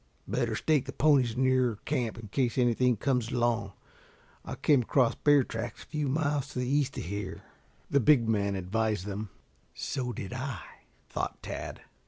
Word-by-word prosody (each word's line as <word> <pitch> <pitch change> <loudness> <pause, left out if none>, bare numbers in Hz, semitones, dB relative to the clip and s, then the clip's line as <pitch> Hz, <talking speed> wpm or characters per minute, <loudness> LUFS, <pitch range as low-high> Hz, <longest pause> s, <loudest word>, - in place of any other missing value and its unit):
"Better 120 -2 0
stake 145 +3 +2
the - - -5
ponies 135 -6 +3
nearer 130 -3 +2
camp 120 -3 -1
in 115 -2 -8
case 125 +2 0
anything 125 -1 +3
comes 125 -1 0
along. 115 -5 0 0.7
I - - -6
came 145 -4 +3
across 120 0 +2
bear 145 -2 +4
tracks 115 -1 -5
a - - -18
few 150 -2 -2
miles 145 0 0
to - - -7
the 125 0 -1
east 140 0 +1
of - - -3
here," 100 +2 -5 0.4
the 140 - +3
big 120 -2 +5
man 100 -3 +1
advised 105 +1 -1
them. 105 +1 -4 0.5
"So 125 -2 -3
did 100 -1 -6
I," 130 -6 -4 0.4
thought - - -4
Tad. - - -6
120 Hz, 170 wpm, -29 LUFS, 110-135 Hz, 0.7 s, big